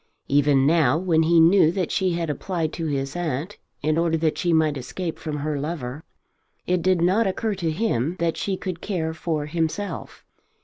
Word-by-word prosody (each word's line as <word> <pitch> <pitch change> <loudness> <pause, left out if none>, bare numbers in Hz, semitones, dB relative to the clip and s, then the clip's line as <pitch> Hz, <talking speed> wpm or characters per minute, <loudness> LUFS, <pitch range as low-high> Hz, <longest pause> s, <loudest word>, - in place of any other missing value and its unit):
Even 140 -1 +3
now, 155 -3 +4
when 170 -2 +2
he 165 +1 +4
knew 165 0 +6
that 185 -3 -1
she 185 -2 +1
had 170 -1 -2
applied 160 +1 -2
to 165 -2 -3
his 135 -1 -2
aunt 170 +2 -3 0.2
in 155 +2 +2
order 165 -1 +1
that 155 -1 0
she 175 - 0
might 160 -2 +3
escape 160 +6 -5
from 155 -2 -4
her 150 0 -2
lover, 145 -2 -5 0.6
it 180 -1 +1
did 185 -1 +2
not 195 +5 +3
occur 215 +3 -1
to 175 -4 -2
him 160 - 0
that 165 -1 0
she 195 -2 -2
could 185 -3 -5
care 165 -5 -2
for 160 -2 -2
himself. 165 +4 -3
165 Hz, 185 wpm, -24 LUFS, 150-180 Hz, 0.6 s, knew